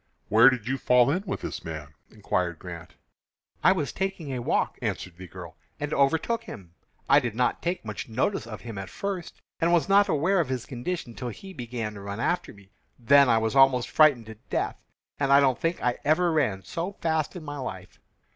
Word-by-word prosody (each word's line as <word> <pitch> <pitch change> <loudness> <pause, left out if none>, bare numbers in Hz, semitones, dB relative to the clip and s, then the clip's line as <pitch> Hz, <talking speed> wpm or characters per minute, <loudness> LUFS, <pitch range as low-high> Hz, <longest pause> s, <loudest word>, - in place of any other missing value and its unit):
"Where 115 +4 +8
did 125 -4 -3
you 135 +1 -1
fall 125 +1 +4
in 180 +5 0
with - - -3
this - - -5
man?" 80 -2 -7 0.2
inquired 90 -5 -2
Grant. 90 +1 -10 0.7
"I - - +7
was 155 -10 -1
taking 190 -7 -3
a 125 - -3
walk," - - 0
answered 90 - -3
the 90 +1 -10
girl, 85 -1 -10 0.2
"and 150 0 -3
overtook 160 +12 +1
him. 85 -3 -10 0.3
I - - +6
did 120 -6 -4
not 125 +1 0
take 175 -6 -2
much 105 +2 -6
notice 125 - -1
of 110 -3 -8
him 115 -4 -7
at 95 -2 -7
first, 195 - -5 0.2
and 165 +1 +2
was 175 -2 +3
not 200 0 +5
aware 170 +6 +2
of 160 - 0
his 130 -2 -3
condition 125 0 -5
till 125 +1 -5
he 190 - -10
began 120 -5 -5
to 100 - -9
run 100 +2 -6
after 175 +9 -1
me. 100 -1 -18 0.3
Then 140 +2 +5
I 115 - +5
was 110 +3 0
almost 135 -2 +4
frightened 145 -7 +5
to 110 0 -10
death, - - -2 0.4
and 140 -1 +1
I 140 - +8
don't 135 -3 +2
think 165 +1 -1
I 125 -1 0
ever 170 +4 +3
ran 125 -12 0
so 175 - -4
fast 160 -2 -1
in 175 - -7
my 145 -1 -6
life." 130 - -7
130 Hz, 210 wpm, -26 LUFS, 110-160 Hz, 0.7 s, Where